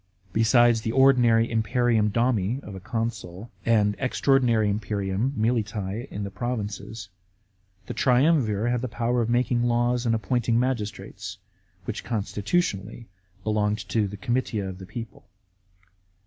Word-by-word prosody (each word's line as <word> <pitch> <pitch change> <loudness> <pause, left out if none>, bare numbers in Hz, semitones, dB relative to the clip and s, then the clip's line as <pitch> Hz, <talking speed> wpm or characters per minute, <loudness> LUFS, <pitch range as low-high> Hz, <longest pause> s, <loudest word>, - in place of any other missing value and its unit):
Besides 115 +1 +4
the 110 0 -2
ordinary 120 -4 +5
imperium 115 -1 +1
domi 115 0 +1
of 100 - -9
a 95 - -7
consul 110 -1 -4 0.2
and 105 -3 +3
an - - -15
extra 130 +2 0
ordinary 120 -5 +3
imperium 100 +2 -1
(militise) 110 -1 -1
in 105 - -5
the 100 - -5
provinces, 105 -2 -5 0.8
the - - -5
triumvir 125 -5 +2
had 120 -1 0
the 130 - -2
power 120 +1 0
of 115 - -1
making 120 0 +2
laws 120 +1 +1
and 115 - +3
of 110 - -2
appointing 120 +1 +1
magistrates, 105 -6 -3 0.5
which 110 +1 -4
consti 105 -3 -3
tutionally 110 - -1 0.4
belonged 105 -1 0
to 110 -3 +1
the 100 +1 -8
comitia 120 -3 -1
of 95 0 -7
the 95 - -10
people. 115 -3 -9
115 Hz, 145 wpm, -25 LUFS, 105-120 Hz, 0.8 s, ordinary